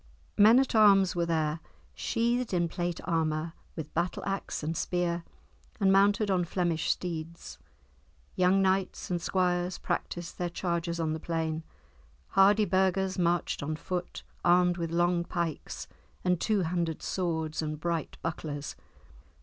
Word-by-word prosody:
Men 215 +4 +7
at 265 0 +2
arms 195 -4 +5
were 170 -1 0
there, 160 -1 0 0.3
sheathed 235 -2 0
in 170 -1 +2
plate 175 0 -3
armour, 160 -1 -1 0.2
with 160 -2 -7
battle 170 +2 -1
axe 195 -5 -3
and 160 +2 -2
spear, 175 0 -1 0.6
and 195 -2 +4
mounted 200 +1 +4
on 180 -2 +2
Flemish 170 -2 -1
steeds. 170 -1 -4 0.8
Young 185 +2 +4
knights 190 -1 0
and 175 -1 0
squires 180 0 0
practised 175 -1 -4
their 175 -1 -1
chargers 170 -1 -2
on 160 -1 0
the 160 - -4
plain. 160 -1 -2 0.7
Hardy 205 +2 +5
burghers 190 0 +1
marched 175 0 +1
on 155 +2 -2
foot, 180 +3 -5 0.2
armed 175 0 +4
with 165 -1 -2
long 175 +1 +2
pikes 170 -3 -4 0.4
and 180 -2 +1
two 210 -3 +2
handed 170 -2 -2
swords 160 -4 -2
and 155 -1 -4
bright 170 -1 -2
bucklers. 150 -3 -4
175 Hz, 140 wpm, -29 LUFS, 165-190 Hz, 0.8 s, Men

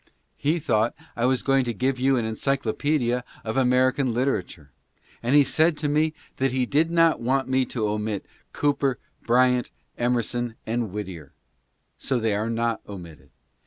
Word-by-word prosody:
He 150 +4 0
thought 120 -8 +1 0.2
I 120 - 0
was 130 -1 +1
going 135 -1 +3
to 120 -2 -3
give 130 +3 0
you 135 +1 +3
an 115 - 0
encyclopedia 125 +2 0 0.2
of 110 - -3
American 130 0 +3
literature, 105 - -2 0.5
and 120 +4 +1
he 145 - +8
said 160 +3 +2
to 150 - -1
me 155 +2 +1 0.2
that 135 -1 +1
he 130 0 +1
did 155 +6 +2
not 165 -1 +3
want 130 +3 0
me 130 0 +2
to 110 -4 -2
omit 105 -1 -2 0.3
Cooper, 140 -3 +1 0.2
Bryant, 125 0 +3 0.3
Emerson, 120 -1 0
and 115 -2 -2
Whittier 95 -8 -7 0.4
— - - -47
so 130 - 0
they 110 -2 +1
are 105 +3 -1
not 115 0 -1
omitted. 85 -8 -10
125 Hz, 160 wpm, -25 LUFS, 110-135 Hz, 0.5 s, he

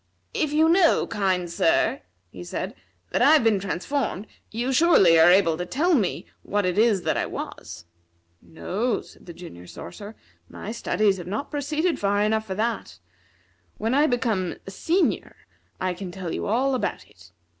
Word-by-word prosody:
"If 300 - 0
you 310 +2 +4
know, 340 0 +4
kind 190 -4 -1
sir," 170 -1 +1 0.3
he 90 - -9
said, 90 - -5 0.4
"that - - 0
I 295 - +7
have 310 - +5
been 220 -3 +3
transformed, 200 +3 -3 0.2
you 240 +4 -2
surely 220 - +5
are 160 +2 +7
able 175 -3 +4
to 180 - -2
tell 340 - +1
me 220 - 0 0.2
what 205 -1 -1
it 180 +2 0
is 215 -5 +3
that - - 0
I - - -1
was." 85 0 -8 0.6
"No," 215 +8 -2
said - - -18
the 170 - -8
Junior 90 - -11
Sorcerer, 205 - -9 0.3
"my 210 - -7
studies 215 -3 +1
have 175 -1 -8
not 215 +10 -4
proceeded 305 +4 -1
far 205 0 +1
enough 220 +1 0
for 190 - -4
that. 215 - -2 0.8
When 225 +3 -1
I 290 +3 +4
become 225 - -1
a 195 - -8
senior 340 - 0 0.4
I 185 -1 -1
can 180 +1 -7
tell 180 -2 -5
you - - -3
all 255 +6 +1
about 255 - -3
it. - - -19
210 Hz, 175 wpm, -24 LUFS, 180-265 Hz, 0.8 s, I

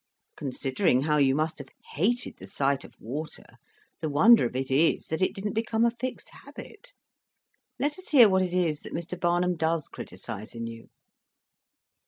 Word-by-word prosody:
Considering 130 -2 0
how 150 +1 +1
you 135 -2 +4
must 155 +1 -1
have 140 - -8 0.3
hated 235 - 0
the - - -11
sight 140 0 0
of - - -15
water, 150 +7 -7 0.4
the 160 - -2
wonder 175 - +6
of 120 - -11
it 130 +1 -2
is 155 +5 +3
that 160 +3 -2
it 185 - +3
didn't 200 0 -3
become 225 +1 +1
a 235 - +3
fixed 250 +2 -6
habit. - - -12 0.9
Let 290 +6 -1
us 370 - -12
hear 250 -7 +8
what 190 -1 +3
it 180 -1 -1
is 165 -5 +1
that - - -8
Mr. 170 +1 -5
Barnum 175 0 +1
does 160 -1 0
criticise 110 +4 -8
in 115 0 -4
you." 115 0 -9
165 Hz, 175 wpm, -27 LUFS, 140-210 Hz, 0.9 s, hear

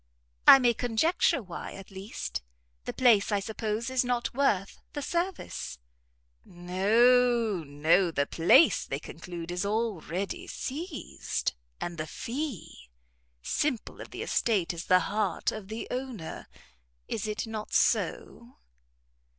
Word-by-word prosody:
"I - - +12
may 245 -3 +3
conjecture 245 +4 +1
why, 180 -3 -7
at 195 0 -11
least; 195 +2 -5 0.4
the - - -2
place, 230 -5 +4
I 205 - +2
suppose, 220 +2 -3
is 260 -1 +2
not 245 -1 -1
worth 210 -8 +1
the 290 - -3
service." 345 - -3 0.7
"No, 225 +5 +3
no; 155 +6 +3
the 140 -3 0
place, 175 - +5
they - - -3
conclude, 175 -1 -8
is 180 +2 -2
already 200 -4 -2
seized, 310 +3 -4 0.3
and 175 -2 -5
the 155 - -3
fee 230 - -5 0.5
simple 275 -7 -2
of - - -9
the - - -6
estate 195 -7 +1
is 170 0 -6
the 185 0 +5
heart 205 -4 -1
of 215 -3 -7
the 220 +2 -5
owner. 250 -10 -5 0.6
Is 215 0 -3
it 215 +2 -2
not 220 -1 -6
so?" 240 +2 0
215 Hz, 125 wpm, -29 LUFS, 180-245 Hz, 0.7 s, I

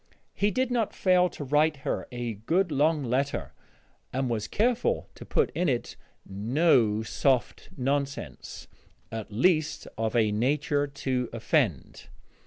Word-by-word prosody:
He 205 - +1
did 255 +3 0
not 235 -4 0
fail 180 -1 +3
to 150 - -7
write 150 +2 +2
her - - -2
a 120 -2 -3
good 165 - 0
long 150 +1 +2
letter, 135 +3 -1 0.6
and 130 -1 -1
was 110 -2 -2
careful 245 - +1
to - - -11
put - - +1
in 180 -3 0
it 120 -3 -2 0.3
no 110 - +2
soft 130 +3 0
nonsense 140 +2 -3 0.4
at 110 -1 -6
least, 155 - +1
of 110 +1 -1
a 110 -3 +3
nature 145 +6 +1
to 130 -3 -2
offend. 115 - -1
140 Hz, 135 wpm, -27 LUFS, 115-160 Hz, 0.6 s, fail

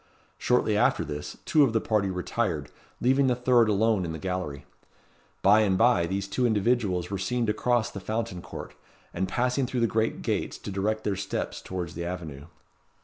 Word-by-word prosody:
Shortly 125 -3 +2
after 105 - +2
this, 75 0 -6
two 155 - +4
of 125 -5 +2
the 115 - +3
party 105 -3 0
retired, 90 - -2 0.3
leaving 135 +2 +3
the 125 - +2
third 120 -2 +4
alone 105 -1 +2
in 80 -2 -4
the - - -4
gallery. 90 -5 -4 0.8
By 105 +3 +6
and 100 -4 +2
by 110 -7 +4
these 95 +1 -2
two 125 +5 +1
individuals 105 -5 +1
were 100 - -2
seen 120 +5 0
to 105 - +1
cross 120 +1 +1
the 100 - -6
Fountain 110 -3 -3
Court, - - -8 0.4
and 95 +2 -1
passing 125 +5 0
through 125 -1 -2
the - - +4
great 110 0 -1
gates, - - -1
to - - -7
direct 105 +3 -1
their 100 - 0
steps 95 - -4
towards 90 -3 -5
the 85 - -5
avenue. 80 -5 -6
105 Hz, 190 wpm, -27 LUFS, 90-120 Hz, 0.8 s, By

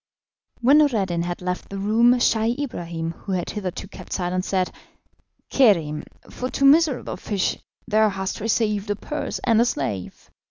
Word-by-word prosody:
When 275 +5 +6
Noureddin 200 - +2
had 175 +1 -5
left 180 0 -3
the 195 - -6
room, 220 +5 +4
Scheih 230 0 +2
Ibrahim, 170 - -4
who 190 +3 -6
had 180 -2 -2
hitherto 195 -2 -5
kept - - -9
silence, 185 0 -2
said: 185 -2 0 0.8
"Kerim, 165 - +3 0.2
for 255 - -5
two 275 - 0
miserable 290 -2 +4
fish 200 -3 -1 0.3
thou 215 -1 +4
hast 190 -1 -4
received 210 -2 0
a 205 - +1
purse 300 +8 -4
and 230 -2 +4
a - - +4
slave. 120 - -4
205 Hz, 155 wpm, -23 LUFS, 180-235 Hz, 0.8 s, When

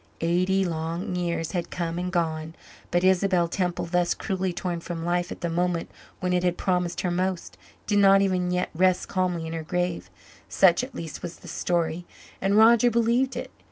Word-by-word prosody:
Eighty 185 +3 +2
long 165 +2 -3
years 170 -2 -2
had 175 -2 -3
come 170 0 -3
and 180 0 -3
gone, 160 -2 -2 0.3
but 175 +1 +1
Isabel 185 -2 +3
Temple, 180 0 -2
thus 175 0 +1
cruelly 190 -2 -2
torn 175 0 -3
from 165 -1 -5
life 175 0 0
at - - -7
the 175 - -1
moment 175 0 -1 0.3
when 180 0 0
it 180 0 +1
had 180 -1 +1
promised 180 -2 0
her 180 - -1
most, 185 0 -2 0.3
did 205 -1 +2
not 195 0 +6
even 185 -2 0
yet 180 0 -1
rest 185 +2 +2
calmly 180 -3 -1
in 160 - -5
her 165 - -3
grave; 175 +2 -2 0.4
such 185 +4 +4
at 265 - -8
least 165 -3 -6
was 175 -1 -6
the - - -15
story, 175 0 -1 0.3
and 195 +2 +2
Roger 235 +2 +6
believed 235 +3 +1
it. - - -5
180 Hz, 190 wpm, -25 LUFS, 170-185 Hz, 0.4 s, not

